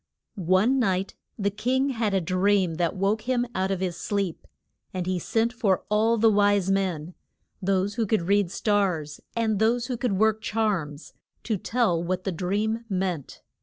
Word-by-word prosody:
One 195 +6 +2
night 190 -4 0 0.2
the 200 -2 0
king 255 +7 0
had 225 -6 0
a 190 - +2
dream 185 -1 +1
that 170 -1 0
woke 205 +5 0
him 245 -1 +2
out 190 -2 0
of 190 -2 -2
his 180 -2 -1
sleep. 200 -5 -3 0.5
And 180 -1 -2
he 185 0 -1
sent 225 +6 0
for 200 -7 +1
all 220 +2 +3
the 225 0 +5
wise 205 -2 +3
men 180 -4 -1 0.5
those 195 +1 +1
who 225 0 -1
could 215 -3 +1
read 200 0 +2
stars, 180 -8 0
and 220 -3 +1
those 235 +2 +2
who 250 -2 -3
could 240 -3 -1
work 220 +2 +2
charms 195 -10 -2 0.3
to 220 - -1
tell 200 -4 0
what 185 +1 -2
the 195 - -1
dream 205 +6 -1
meant. 185 -7 -3
200 Hz, 170 wpm, -26 LUFS, 185-220 Hz, 0.5 s, the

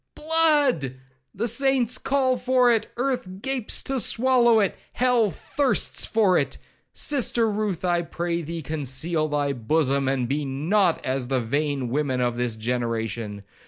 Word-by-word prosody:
blood! 295 - +2 0.4
the 225 +5 -2
saints 255 0 +1
call 265 -2 +1
for 250 -1 +3
it, 225 -1 -2
earth 250 -5 -1
gapes 255 0 -2
to 270 -1 -1
swallow 240 -1 +3
it, 200 -3 +1 0.2
hell 245 -4 +2
thirsts 270 - -1
for 205 -5 +3
it!—Sister 245 -5 -1
Ruth, 205 -4 -2
I 175 -1 +2
pray 170 0 -3
thee, 165 0 -6
conceal 155 +2 -2
thy 145 -1 -1
bosom, 135 +2 0
and 130 -2 0
be 145 +4 -1
not 165 +7 +1
as 130 -1 -2
the 130 0 0
vain 140 +2 -1
women 135 -1 -1
of 120 -1 0
this 120 -2 -2
generation. 115 -3 -3
170 Hz, 140 wpm, -24 LUFS, -, 0.4 s, for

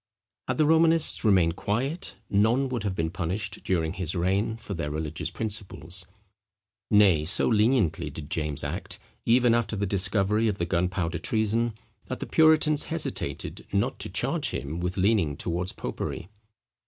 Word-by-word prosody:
Had 130 - -1
the 155 - +4
Romanists 160 +1 +4
remained 90 -6 +3
quiet, 130 - -2
none 115 +7 +2
would 125 -3 -2
have 100 -2 -2
been 80 -2 -1
punished 90 +5 -3
during 80 -3 0
his 90 -2 -3
reign 95 +6 0
for 105 - -7
their 80 -5 -3
religious 80 +1 -3
principles. 90 -3 -4 0.8
Nay, 100 -7 +5
so 80 - +1
leniently 110 - +2
did 75 -2 -7
James 75 -3 -1
act, - - -4 0.3
even 120 0 +4
after 115 -2 0
the 100 0 -1
discovery 100 +3 +2
of 105 -2 -1
the 85 - -1
gunpowder 85 -1 -1
treason, 110 +4 0 0.3
that - - -5
the - - -4
puritans 155 -1 +4
hesitated 165 -1 -3
not - - 0
to - - -3
charge - - 0
him 75 +5 -4
with 90 +2 -3
leaning 95 -7 +2
towards 90 +1 0
popery. 85 - -5
100 Hz, 155 wpm, -26 LUFS, 85-115 Hz, 0.8 s, Nay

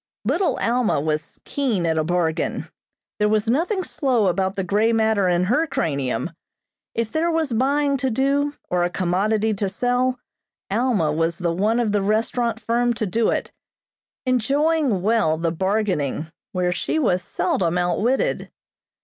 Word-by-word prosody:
Little 330 - +1
Alma 235 -6 +1
was 155 +1 -3
keen 240 -11 -1
at 160 -1 +1
a - - +1
bargain. 170 -1 -1 0.5
There 210 0 +3
was 215 0 +1
nothing 350 - +1
slow 255 - +1
about 190 +1 0
the 195 - -1
grey 210 +5 +2
matter 220 -3 +2
in 175 0 +2
her 245 - +2
cranium. 140 - -1 0.6
If 230 -1 -1
there 325 +2 +1
was 325 -4 0
buying 280 +4 +1
to 265 0 0
do, 280 +4 +1
or 180 -1 +1
a 175 - +1
commodity 205 +5 0
to 200 -1 -1
sell, 245 +4 0 0.5
Alma 210 -8 +1
was 165 +2 0
the 175 -3 -1
one 215 +7 +1
of 230 -3 +1
the 205 -1 +1
restaurant 225 +3 0
firm 235 +2 +1
to 220 - -1
do 220 +4 +1
it, - - -2 0.7
enjoying 270 - +1
well 205 -8 +2
the 165 0 -1
bargaining, 180 -5 -1 0.2
where 180 -1 0
she 180 - -1
was 185 -12 +2
seldom 175 0 -1
outwitted. 180 +9 0
215 Hz, 155 wpm, -22 LUFS, 180-250 Hz, 0.7 s, There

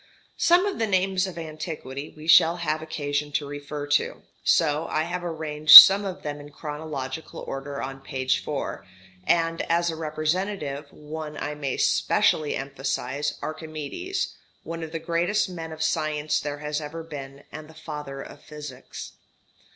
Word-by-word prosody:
Some 350 +2 +4
of 405 - -3
the 225 - +1
names 190 -1 +1
of 180 - -8
antiquity 155 -3 -6
we 155 - -10
shall 165 +1 +6
have 155 -2 -2
occasion 145 -2 -3
to 150 - 0
refer 145 0 -6
to; 145 0 0 0.2
so 155 0 +2
I 155 - 0
have 175 +2 -4
arranged 155 -2 +8
some 200 +1 +11
of 190 -2 -6
them 145 -1 -4
in 145 0 -11
chronological 150 -1 -6
order 140 +1 -6
on 135 0 -6
page 130 -1 -1
4, 145 -8 -4 0.4
and 165 -1 +2
as 170 0 +2
a - - -6
representative 155 -1 -3
one 150 0 -8
I 150 - -3
may 140 -3 -3
specially 150 -2 +2
emphasize 135 +1 -3
Archimedes, 155 - -4 0.3
one 165 0 -6
of 160 -1 -6
the 165 - -3
greatest 170 +6 0
men 165 -3 -7
of 160 0 -4
science 155 -2 0
there 145 -1 -4
has 150 +1 -3
ever 155 +2 -7
been, 140 -3 -9
and 155 0 -9
the 160 - -15
father 150 -3 -7
of 145 - -13
physics. 150 -1 -9
155 Hz, 160 wpm, -25 LUFS, 145-165 Hz, 0.4 s, some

